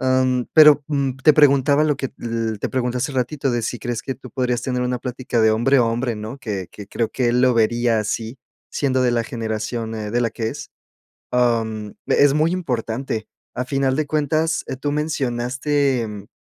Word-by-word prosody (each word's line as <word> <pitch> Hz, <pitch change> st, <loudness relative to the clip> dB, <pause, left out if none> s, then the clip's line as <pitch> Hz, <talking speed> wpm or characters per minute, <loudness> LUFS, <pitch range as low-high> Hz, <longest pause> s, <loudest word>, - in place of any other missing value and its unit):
Em, 130 Hz, -1 st, +1 dB
pero, 150 Hz, -2 st, +7 dB
mm, 140 Hz, -3 st, -1 dB
te 155 Hz, -, +8 dB
preguntaba 140 Hz, 0 st, +4 dB
lo 150 Hz, -2 st, +1 dB
que 135 Hz, -1 st, -4 dB
l 115 Hz, -2 st, -3 dB
te -, -, -2 dB
pregunté 125 Hz, -1 st, -1 dB
hace 130 Hz, -, -1 dB
ratito, 135 Hz, +2 st, -1 dB
de 120 Hz, -1 st, -1 dB
si 120 Hz, +2 st, -3 dB
crees 120 Hz, 0 st, -3 dB
que 135 Hz, -, -4 dB
tú 130 Hz, -1 st, -12 dB
podrías 125 Hz, -1 st, -1 dB
tener 125 Hz, -1 st, -1 dB
una 125 Hz, 0 st, -1 dB
plática 125 Hz, -1 st, -2 dB
de 110 Hz, 0 st, +5 dB
hombre 120 Hz, +5 st, +3 dB
a -, -, +5 dB
hombre, 115 Hz, +1 st, -1 dB
¿no? 110 Hz, +5 st, -7 dB
Que 100 Hz, -9 st, -4 dB
que 105 Hz, -, -10 dB
creo 115 Hz, +1 st, -1 dB
que 125 Hz, -, -1 dB
él 125 Hz, +1 st, +2 dB
lo 130 Hz, -1 st, +4 dB
vería 115 Hz, 0 st, +2 dB
así, 110 Hz, +4 st, -4 dB, 0.3 s
siendo 130 Hz, -2 st, +1 dB
de 125 Hz, -, +3 dB
la 120 Hz, -1 st, 0 dB
generación, 110 Hz, 0 st, -4 dB
eh, 105 Hz, -1 st, -5 dB
de 120 Hz, -, +1 dB
la 115 Hz, -, 0 dB
que 110 Hz, 0 st, -3 dB
es. -, -, -8 dB, 0.6 s
Am, 115 Hz, -4 st, 0 dB
e -, -, +4 dB
es 140 Hz, -1 st, +4 dB
muy 155 Hz, +3 st, +2 dB
importante. 125 Hz, -8 st, -3 dB, 0.3 s
A 125 Hz, -, -1 dB
final 135 Hz, -1 st, 0 dB
de 155 Hz, 0 st, 0 dB
cuentas, 155 Hz, +2 st, 0 dB
eh, -, -, -3 dB
tú 145 Hz, +2 st, -2 dB
mencionaste, 135 Hz, -2 st, 0 dB
mm, 105 Hz, -1 st, -8 dB
125 Hz, 205 wpm, -21 LUFS, 115-135 Hz, 0.6 s, te